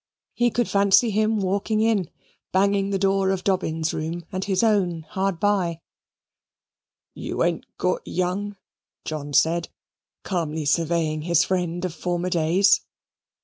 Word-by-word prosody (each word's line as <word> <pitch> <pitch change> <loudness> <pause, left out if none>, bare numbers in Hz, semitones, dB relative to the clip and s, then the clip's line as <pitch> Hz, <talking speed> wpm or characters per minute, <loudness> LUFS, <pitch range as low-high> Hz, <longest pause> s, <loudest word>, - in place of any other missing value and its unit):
He 240 0 +2
could 240 0 0
fancy 200 +3 +4
him 215 +1 +1
walking 200 +3 0
in, 215 -6 +1 0.4
banging 195 +1 +2
the 195 - 0
door 195 0 +2
of 190 -1 -1
Dobbin's 165 -4 0
room, 165 +2 -4
and 185 -1 -3
his 195 +1 0
own 185 -7 +1
hard 190 -2 -1
by 180 -5 0 1.3
"You - - -3
ain't - - -1
got - - 0
young," 195 +3 -2 0.5
John 150 -2 -5
said, 160 +5 +2 0.5
calmly 160 -5 -2
surveying 160 0 +1
his 170 +2 +3
friend 175 -1 -1
of 180 - -3
former 175 +2 -2
days. 175 +4 +3
185 Hz, 135 wpm, -24 LUFS, 165-200 Hz, 1.3 s, fancy